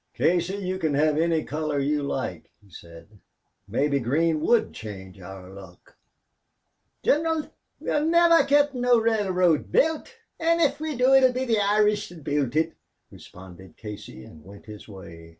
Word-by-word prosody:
"Casey, 175 +2 +1
you 185 -2 -4
can 155 -5 -1
have 150 +1 +2
any 165 0 +1
color 150 0 -3
you 145 +2 0
like," 140 - -4
he 100 -2 -24
said. 85 +5 -14 0.5
"Maybe 140 +7 0
green 155 +6 0
would 235 +8 +2
change 95 -3 -10
our 95 0 -10
luck." 95 -3 -15 1.1
"Gineral, 320 +1 0 0.3
we'll 300 +1 -1
niver 340 0 +5
git 290 0 +3
no 245 -1 +3
railroad 190 -8 +1
built, 320 +9 0 0.2
an' 335 +1 +2
if 295 -4 +1
we 310 -1 -4
do 255 +2 +3
it'll 260 -1 +5
be 255 +1 -2
the 225 -4 +1
Irish 210 +1 +1
thot 170 -4 -13
builds 145 -2 -1
it," 160 +1 +1 0.4
responded 95 -1 -14
Casey, 105 - -10
and 75 +4 -15
went 100 +4 -14
his 105 -1 -11
way. 85 -5 -12
160 Hz, 155 wpm, -25 LUFS, -, 1.1 s, niver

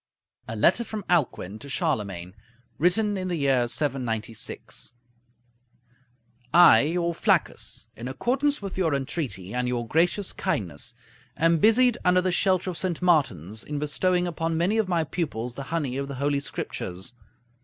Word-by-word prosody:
A 110 - -5
LETTER 170 - +4
FROM 215 -3 -6
ALCUIN 120 - 0
TO 140 - -9
CHARLEMAGNE 95 -8 -2 0.5
(Written 205 +5 +2
in 185 -1 -3
the 180 - -1
year 135 -5 +2
796) 120 -6 -3 1.6
I, 170 -9 +8
your 170 +5 0
Flaccus, - - 0
in 120 - -7
accordance 265 - 0
with 190 -1 -5
your 160 -6 +2
entreaty 135 - -3
and 125 0 0
your 120 -1 -2
gracious 175 - +1
kindness, 110 - -3 0.4
am 165 0 +3
busied 240 +5 +4
under 180 0 +4
the 185 0 0
shelter 185 0 +2
of 170 - -5
St. 180 -4 -1
Martin's, 110 - +1
in 150 - -5
bestowing 175 +5 +1
upon 165 -1 -2
many 190 +7 +2
of 210 -4 0
my 170 -2 +2
pupils 130 -7 -3
the 140 - -7
honey 145 -6 -1
of 140 0 -3
the 140 - -6
Holy 140 +1 0
Scriptures. 95 -8 -5
155 Hz, 150 wpm, -26 LUFS, 120-180 Hz, 1.6 s, I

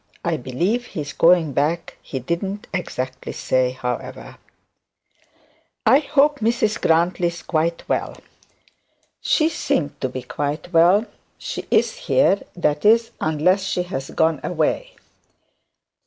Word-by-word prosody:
I - - +1
believe 180 - -1
he 155 - -5
is 145 - -6
going 165 -4 +4
back; 155 +5 -1
he 135 - -6
didn't 190 +9 -3
exactly 130 -7 -4
say, 130 -1 +1
however.' 125 -1 -5 1.5
'I 270 - +6
hope 295 0 +2
Mrs 220 -1 0
Grantly 170 +2 +2
is 170 0 -6
quite 165 +1 -1
well.' - - -2 1.0
'She 315 -1 +2
seemed 160 - -2
to 130 - -1
be 130 0 -6
quite 145 +7 -4
well. 180 +6 +5 0.3
She - - -6
is - - +2
here; 200 - +2
that 150 -4 0
is, 230 +2 +4
unless 160 +5 +2
she 185 -2 -1
has 135 -7 -5
gone 160 -2 +1
away.' 180 - -1
170 Hz, 125 wpm, -21 LUFS, 145-205 Hz, 1.5 s, I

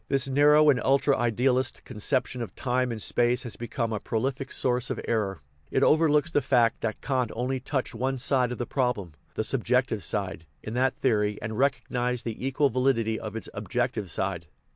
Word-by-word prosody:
This 135 0 +1
narrow 150 +2 +5
and 130 - 0
ultra 140 +1 +3
idealist 125 +2 +1
conception 125 +4 -1
of 115 - -6
time 125 -1 0
and 115 - -4
space 120 +3 +1
has 120 - -7
become 115 -1 -3
a 105 - -2
prolific 130 +5 -2
source 125 -1 0
of - - -3
error. 100 -7 -1 0.3
It 135 - +1
overlooks 155 +1 +3
the 145 - +2
fact 120 -3 +2
that 110 -1 -3
Kant 130 -4 0
only 130 +3 -1
touched 130 0 -3
one 130 +3 -1
side 125 -1 +2
of 125 - -4
the 120 - -3
problem, 120 - -1 0.2
the - - 0
subjective - - +1
side, 80 - -3 0.2
in 110 - -5
that 130 +2 +1
theory, 105 -5 +1
and 110 0 -5
recognized 125 -2 0
the 115 +1 -5
equal 140 +1 +2
validity 115 -3 +1
of 110 0 -7
its 115 - -4
objective 105 0 -2
side. 90 -4 -2
125 Hz, 185 wpm, -27 LUFS, 110-135 Hz, 0.3 s, narrow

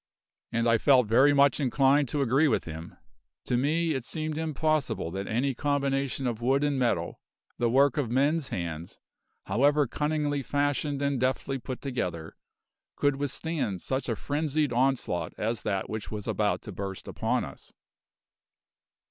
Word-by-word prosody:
And 115 0 +1
I 115 -1 +4
felt 130 -2 +5
very 130 +7 +5
much 140 -1 +4
inclined 135 0 +3
to 145 +1 0
agree 135 +5 +3
with 125 - +1
him. 80 0 -8 0.5
To 125 - 0
me 160 +6 +1
it 135 -5 -2
seemed 155 +4 -3
impossible 155 - -1
that 95 +2 -4
any 130 +5 0
combination 140 0 -1
of 120 -2 -2
wood 135 +4 +2
and 145 -2 +1
metal, 125 -2 0 0.4
the 120 - +2
work 135 +2 +4
of 140 -6 0
men's 140 +4 +1
hands, 85 -1 -5 0.5
however 145 +8 +3
cunningly 150 +1 -1
fashioned 145 +1 -1
and 140 -2 0
deftly 130 +1 -1
put 130 0 -6
together, 90 - -4 0.6
could 145 -1 +1
withstand 145 - -2
such 130 -1 -2
a 115 - 0
frenzied 150 +1 -1
onslaught 125 -8 0
as 110 0 -2
that 95 -2 -2
which 110 -1 -5
was 105 -2 -6
about - - 0
to - - -7
burst 95 -1 -6
upon - - -1
us. - - -12
135 Hz, 155 wpm, -28 LUFS, 115-145 Hz, 0.6 s, felt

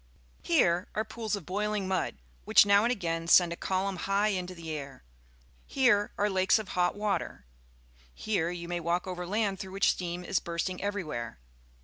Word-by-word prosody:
Here 170 +2 +2
are 215 - 0
pools 220 -1 -3
of 195 -6 -8
bpilingjnud, 200 -1 -1 0.3
which - - +6
now 200 0 +5
and 240 - +2
again 165 -7 -2
send 170 0 +6
a - - -5
columnhigrrinto 190 0 -1
the 165 -2 -7
air; 140 -3 -7 0.6
here 240 -7 +3
are 205 - +2
lakes 190 0 +3
of 215 -2 -6
hot 180 -1 +1
water; 205 - -2 0.7
here 185 -6 -1
you 175 -1 -6
may 175 0 -2
walk 170 +1 -1
over 180 -1 -5
land 200 -1 0
through 190 -1 -7
which 195 - +3
.steam 175 0 -4
is 185 +1 0
bursting 170 +2 -3
every 205 0 -2
where. 120 - -5
185 Hz, 165 wpm, -29 LUFS, 170-205 Hz, 0.7 s, which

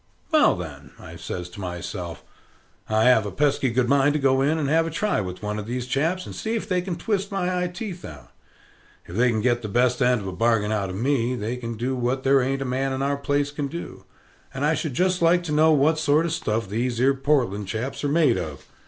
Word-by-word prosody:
"Well, - - +5
then," - - -9 0.3
says 90 -1 -5
I - - -17
to - - -10
myself, 90 -1 -6 0.7
"I 110 0 +2
have 110 -4 +4
a - - -5
pesky 140 +2 +1
good 120 +1 +1
mind 140 +2 +3
to 150 - 0
go 135 -1 +3
in 150 +4 +2
and 150 -3 -1
have 165 +3 +2
a - - -2
try 180 - 0
with 90 +1 -7
one 105 0 -2
of 105 - -7
these 125 +1 -3
chaps, 160 +8 -1
and - - -8
see 225 +1 -3
if 225 - -3
they 185 -2 +1
can 180 -1 -4
twist 200 +1 -2
my 180 -2 -1
eye 180 - 0
teeth 180 -1 -7
out. - - -11 0.7
If 85 - -9
they 125 +3 +3
can 110 -2 0
get 120 +1 +1
the 110 - -5
best 125 +3 +2
end 125 -2 +3
of 95 - -6
a - - -3
bargain 110 +1 +1
out 100 -3 -1
of 95 - -5
me, 125 +2 0
they 115 +1 -3
can 115 -2 -6
do 130 +4 -1
what 125 +2 -1
there 135 0 +4
ain't 135 +2 -1
a - - -6
man 135 +1 -1
in 130 +1 -2
our 140 +1 +1
place 145 0 -1
can 145 -1 -3
do; 170 +4 -8 0.5
and 135 +2 -1
I 155 - +3
should 155 -5 -3
just 185 +2 +1
like 175 +1 +4
to 165 - -4
know 155 +1 +4
what 155 +2 +3
sort 155 +1 +3
of 165 - -1
stuff 110 -8 -1
these 115 +4 -2
'ere 135 +2 +4
Portland 130 -8 0
chaps 115 +9 -4
are 145 - +1
made 155 - +3
of." 75 -6 -6
135 Hz, 250 wpm, -24 LUFS, 115-155 Hz, 0.7 s, Well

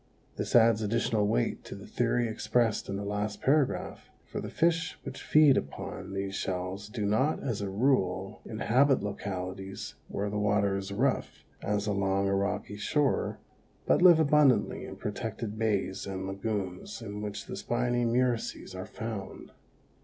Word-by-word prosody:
This - - -2
adds 115 -2 +6
additional 110 -1 +1
weight - - 0
to - - -7
the - - -10
theory 120 -1 +1
expressed 110 0 0
in 100 - -2
the 100 +1 -4
last 105 +1 -2
paragraph, 140 0 0 0.2
for - - -5
the - - -5
fish 165 +1 +1
which - - -7
feed 150 -3 +6
upon 70 +6 -5
these 95 0 -2
shells 95 +2 -3
do 105 -2 -3
not, 110 +9 +1
as 120 -6 -2
a 100 - -2
rule, 95 -4 +1
inhabit 130 +4 +2
localities 95 -1 -5
where 100 +1 -2
the 105 - -1
water 105 -1 +2
is 95 0 -4
rough, 100 - -1 0.2
as 105 0 -1
along 100 -1 +1
a 100 - +1
rocky 100 +1 -1
shore, 140 +6 +1 0.5
but - - +3
live 175 -3 +8
abundantly 145 -7 +3
in - - -8
protected 110 +1 -4
bays 100 -3 0
and 95 -1 -4
lagoons 95 +1 -4
in 105 -1 -6
which 105 -1 -5
the - - -6
spiny 120 0 0
murices 120 -4 0
are 95 0 -6
found. 110 -4 -6
105 Hz, 155 wpm, -29 LUFS, 100-120 Hz, 0.5 s, live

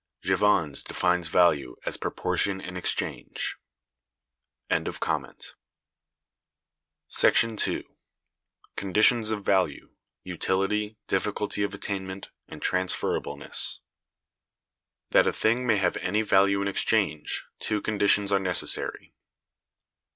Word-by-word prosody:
Jevons(198) 80 -9 +1
defines 90 -1 0
value 80 -7 +2
as - - -1
"proportion 100 -1 -1
in 90 -1 -8
exchange." 90 - -1 1.1
§ - - -3 2.0
2. - - -1 0.9
Conditions 110 +3 +4
of 105 -2 -3
Value: 95 -7 0 0.3
Utility, 95 +4 -2
Difficulty 105 +1 -2
of 100 0 -2
Attainment, 95 -1 -6 0.2
and - - -10
Transferableness. 90 0 0 1.3
That - - +5
a - - +3
thing 120 +3 +1
may 110 -3 +3
have 95 -3 0
any 105 +4 -1
value 100 -1 +3
in - - -2
exchange, 100 -5 0
two 105 -1 -1
conditions 100 -1 +2
are 100 - +3
necessary. 90 -2 -2
100 Hz, 90 wpm, -26 LUFS, 90-105 Hz, 2.0 s, That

